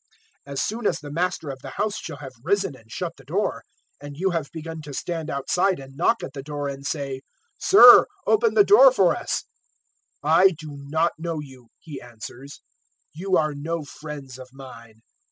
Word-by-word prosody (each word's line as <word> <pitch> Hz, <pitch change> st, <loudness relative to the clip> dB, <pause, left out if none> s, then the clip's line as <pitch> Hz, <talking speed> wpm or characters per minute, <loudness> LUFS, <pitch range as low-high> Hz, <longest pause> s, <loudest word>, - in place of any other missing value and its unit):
013:025 140 Hz, -, -7 dB
As 135 Hz, -, -1 dB
soon 220 Hz, 0 st, -2 dB
as 165 Hz, -, 0 dB
the 145 Hz, -1 st, -9 dB
Master 170 Hz, -1 st, -2 dB
of 135 Hz, -, -9 dB
the -, -, -8 dB
house 210 Hz, 0 st, -1 dB
shall 160 Hz, -4 st, -7 dB
have 135 Hz, -2 st, -10 dB
risen 195 Hz, -3 st, 0 dB
and 110 Hz, -3 st, -20 dB
shut 170 Hz, +4 st, -5 dB
the 135 Hz, -, -16 dB
door, 180 Hz, +10 st, -2 dB, 0.4 s
and 145 Hz, 0 st, -9 dB
you 190 Hz, +3 st, 0 dB
have 165 Hz, -4 st, -2 dB
begun 160 Hz, 0 st, -7 dB
to 145 Hz, -2 st, -9 dB
stand 165 Hz, -1 st, -4 dB
outside 180 Hz, +7 st, 0 dB
and 135 Hz, 0 st, -12 dB
knock 180 Hz, +9 st, +1 dB
at 135 Hz, -, -7 dB
the 140 Hz, -, -6 dB
door 145 Hz, 0 st, -5 dB
and 140 Hz, 0 st, -6 dB
say, 140 Hz, -4 st, -4 dB, 0.4 s
"`Sir, 400 Hz, +1 st, +9 dB, 0.2 s
open 440 Hz, +1 st, +2 dB
the 405 Hz, -, +7 dB
door -, -, +7 dB
for -, -, +3 dB
us' -, -, -3 dB, 0.8 s
"`I 190 Hz, -3 st, +5 dB
do 155 Hz, -1 st, -9 dB
not 155 Hz, +4 st, 0 dB
know 165 Hz, -1 st, -3 dB
you,' 130 Hz, -4 st, -12 dB
He 155 Hz, -3 st, -10 dB
answers; 125 Hz, +3 st, -11 dB, 0.5 s
`you 185 Hz, +3 st, 0 dB
are 155 Hz, -1 st, 0 dB
no 160 Hz, +3 st, -4 dB
friends 140 Hz, -3 st, -9 dB
of 130 Hz, 0 st, -11 dB
mine.' 115 Hz, -4 st, -13 dB
150 Hz, 190 wpm, -24 LUFS, 135-175 Hz, 0.8 s, `Sir